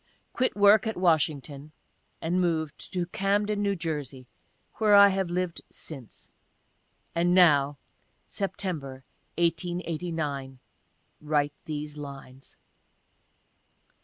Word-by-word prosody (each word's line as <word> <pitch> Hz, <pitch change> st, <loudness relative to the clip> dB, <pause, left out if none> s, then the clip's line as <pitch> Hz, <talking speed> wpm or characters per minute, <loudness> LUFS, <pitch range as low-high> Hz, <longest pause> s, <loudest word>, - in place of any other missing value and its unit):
Quit 255 Hz, -, 0 dB
work 205 Hz, +1 st, +6 dB
at 220 Hz, -, -3 dB
Washington, 155 Hz, -4 st, 0 dB, 0.5 s
and 175 Hz, +3 st, +1 dB
moved 160 Hz, -4 st, -2 dB
to 180 Hz, -2 st, -1 dB
Camden, 205 Hz, +3 st, 0 dB
New 200 Hz, -1 st, +1 dB
Jersey 145 Hz, -6 st, -4 dB, 0.3 s
— -, -, -42 dB
where 210 Hz, -2 st, +5 dB
I 200 Hz, 0 st, +9 dB
have 190 Hz, -2 st, -1 dB
lived 180 Hz, -1 st, -2 dB
since, 135 Hz, -8 st, -10 dB, 0.8 s
and 175 Hz, +1 st, +2 dB
now, 145 Hz, -6 st, +5 dB, 0.5 s
(September, 160 Hz, -10 st, -4 dB, 0.3 s
1889,) 165 Hz, -5 st, -2 dB, 0.6 s
write 150 Hz, -1 st, 0 dB
these 150 Hz, -1 st, -5 dB
lines. 135 Hz, -2 st, -10 dB
165 Hz, 100 wpm, -27 LUFS, 145-185 Hz, 0.8 s, I